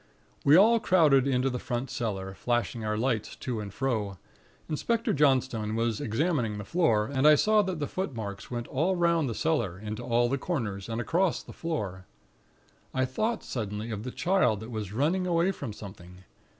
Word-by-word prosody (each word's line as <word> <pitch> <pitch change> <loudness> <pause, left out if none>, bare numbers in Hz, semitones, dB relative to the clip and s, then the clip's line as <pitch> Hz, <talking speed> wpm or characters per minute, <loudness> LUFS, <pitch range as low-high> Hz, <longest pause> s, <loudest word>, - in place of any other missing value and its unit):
"We 145 - +6
all 225 +6 +6
crowded 150 - +4
into 130 0 +1
the 125 - -3
front 125 +1 -3
cellar, 100 -6 -3
flashing 120 +1 -1
our 105 0 -1
lights 115 -2 -1
to 120 -4 -4
and 105 -2 -6
fro. 105 -5 -2 0.5
Inspector 230 +9 0
Johnstone 130 -7 +2
was 115 -1 0
examining 115 -2 0
the 105 - -5
floor, 115 - +2
and 135 +3 +2
I 150 - +8
saw 215 +7 +4
that 185 -3 -2
the 150 - -2
footmarks 115 - -5
went 120 -1 -4
all 165 +8 +1
'round 170 -5 +2
the 115 - -4
cellar, 120 - 0
into 105 +1 -6
all 120 0 +2
the 135 +3 -1
corners, 110 - -3
and 115 0 -2
across 170 +8 +1
the - - -11
floor. 100 - -4 0.9
I 130 0 +2
thought 215 - -1
suddenly 110 -1 -4
of 105 -2 -4
the 125 - -5
Child 175 - +2
that 110 +2 -8
was 105 -4 -4
running 160 - +1
away 170 +2 +2
from 140 - -6
Something. 95 -3 -11
125 Hz, 180 wpm, -28 LUFS, 110-160 Hz, 0.9 s, I